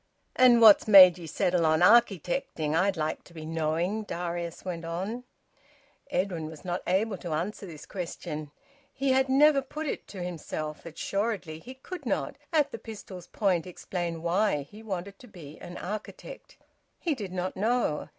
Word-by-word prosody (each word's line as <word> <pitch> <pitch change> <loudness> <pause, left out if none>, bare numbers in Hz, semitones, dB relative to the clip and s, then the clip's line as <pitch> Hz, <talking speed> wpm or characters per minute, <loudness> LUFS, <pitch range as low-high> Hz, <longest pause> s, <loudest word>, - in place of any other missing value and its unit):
"And 245 -2 +6
what's 220 -2 +8
made 185 -4 +9
ye 165 - -8
settle 175 +2 +1
on 160 +1 +3
architecting, 180 - +3
I'd 190 +2 +2
like 155 0 -2
to 170 - -18
be 155 -1 -7
knowing?" 165 +6 -1
Darius 175 -4 -5
went 175 -2 -4
on. 190 +9 -4 0.8
Edwin 180 - -1
was 160 +2 -11
not 175 0 -2
able 195 +3 +1
to 170 -3 -4
answer 190 +6 -3
this 155 -4 -10
question. 155 -5 -6 0.4
He 270 0 0
had 265 0 +3
never 280 +1 +5
put 300 +4 -6
it 290 - -4
to 185 -3 -7
himself. 155 -3 -5
Assuredly 195 -1 -3
he 255 +10 -11
could 355 +8 -8
not, - - -1 0.2
at 295 -3 +2
the - - -6
pistol's 195 -5 -10
point, 185 -5 0
explain 175 -2 -5
why 175 -3 +1
he 205 +10 -14
wanted 195 -2 -6
to 250 - -14
be 155 -8 -12
an 175 - -9
architect. 215 - -8 0.4
He 335 - 0
did 205 -9 -6
not 185 0 -3
know. 220 -7 0
185 Hz, 165 wpm, -28 LUFS, 165-220 Hz, 0.8 s, made